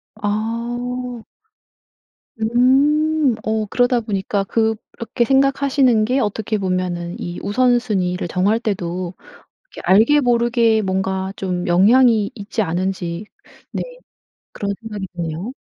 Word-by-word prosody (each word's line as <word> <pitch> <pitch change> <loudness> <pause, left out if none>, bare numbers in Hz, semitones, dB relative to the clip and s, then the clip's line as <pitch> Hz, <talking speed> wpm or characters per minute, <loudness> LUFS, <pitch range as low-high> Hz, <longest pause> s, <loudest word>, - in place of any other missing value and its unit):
아. 235 +3 -3 1.2
음. 275 +5 +3
어 220 0 -1
그러다 245 +3 +2
보니까 200 -2 -2
'그렇게 225 +3 -1
생각하시는 270 -3 +3
게 255 +5 +1
어떻게 215 -1 -1
보면은 180 -2 -2
이 175 0 -5
우선순위를 210 -6 +1
정할 200 +6 +1
때도 185 -4 -3 0.6
이렇게 - - -9
알게 225 +10 +5
모르게 235 -3 +2
뭔가 190 0 -2
좀 180 -1 -3
영향이 215 +4 +4
있지 210 +2 -3
않은지?' 180 0 -2 0.5
네 - - -3 0.7
그런 200 -1 -3
생각이 210 -3 -5
드네요. 170 +6 -4
220 Hz, 235 characters per minute, -20 LUFS, 190-245 Hz, 1.2 s, 알게